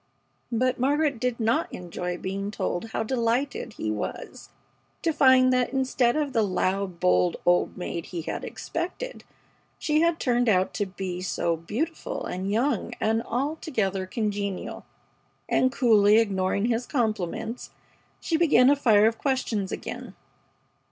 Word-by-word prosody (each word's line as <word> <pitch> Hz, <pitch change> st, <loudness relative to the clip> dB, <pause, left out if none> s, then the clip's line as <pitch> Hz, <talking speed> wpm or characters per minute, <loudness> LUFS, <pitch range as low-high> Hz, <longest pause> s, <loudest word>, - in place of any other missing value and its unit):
But 250 Hz, +2 st, +1 dB
Margaret 285 Hz, 0 st, +1 dB
did 250 Hz, 0 st, -1 dB
not 225 Hz, +1 st, +1 dB
enjoy 180 Hz, 0 st, -5 dB
being 195 Hz, +2 st, -4 dB
told 195 Hz, -2 st, -2 dB
how 225 Hz, -, -2 dB
delighted 240 Hz, +1 st, -1 dB
he 110 Hz, -, -3 dB
was 105 Hz, -1 st, -6 dB, 0.5 s
to 330 Hz, -2 st, +1 dB
find 260 Hz, -3 st, +5 dB
that 250 Hz, +1 st, +1 dB
instead 260 Hz, -2 st, +2 dB
of 295 Hz, -3 st, -1 dB
the 230 Hz, -, +3 dB
loud, 190 Hz, -2 st, -1 dB
bold 90 Hz, 0 st, +3 dB
"old 175 Hz, 0 st, +2 dB
maid" 170 Hz, -2 st, -4 dB
he 170 Hz, -3 st, -5 dB
had -, -, -4 dB
expected, 365 Hz, +9 st, -5 dB, 0.5 s
she 305 Hz, 0 st, +1 dB
had 335 Hz, 0 st, +2 dB
turned 245 Hz, -2 st, +2 dB
out 185 Hz, -2 st, +2 dB
to 205 Hz, -, -1 dB
be 185 Hz, -1 st, -5 dB
"so 170 Hz, -2 st, 0 dB
beautiful 245 Hz, -, -4 dB
and 185 Hz, +2 st, -3 dB
young 235 Hz, +1 st, 0 dB
and 225 Hz, +1 st, +1 dB
altogether 230 Hz, -8 st, -2 dB
congenial"; 200 Hz, -2 st, -3 dB, 0.6 s
and, 260 Hz, -, +2 dB
coolly 215 Hz, -5 st, +5 dB
ignoring 200 Hz, -2 st, +1 dB
his 235 Hz, +1 st, 0 dB
compliments, 220 Hz, -, -2 dB, 0.5 s
she 325 Hz, -, 0 dB
began 290 Hz, -5 st, +5 dB
a -, -, +5 dB
fire 220 Hz, -7 st, +4 dB
of 225 Hz, +1 st, +1 dB
questions 230 Hz, -8 st, -1 dB
again. -, -, -6 dB
225 Hz, 140 wpm, -26 LUFS, 190-260 Hz, 0.6 s, find